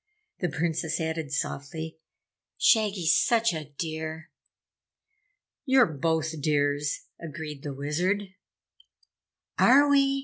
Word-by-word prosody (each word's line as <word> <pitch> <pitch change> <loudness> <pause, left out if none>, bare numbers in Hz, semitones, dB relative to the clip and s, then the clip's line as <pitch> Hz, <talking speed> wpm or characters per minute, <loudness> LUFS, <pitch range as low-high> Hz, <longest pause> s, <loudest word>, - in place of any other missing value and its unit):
The 180 - 0
Princess 160 +1 -1
added 160 -3 -3
softly, 160 +3 -4 0.6
"Shaggy's 200 -7 +3
such 230 -3 +3
a 155 -2 -4
dear!" 160 -1 -5 1.3
"You're 265 -3 +5
both 160 +1 -1
dears!" 145 -1 0 0.2
agreed 155 -3 -7
the 140 -2 -6
Wizard. 175 +9 0 1.4
"Are 280 +4 +6
we?" 275 -1 +3
160 Hz, 95 wpm, -27 LUFS, 150-195 Hz, 1.4 s, Are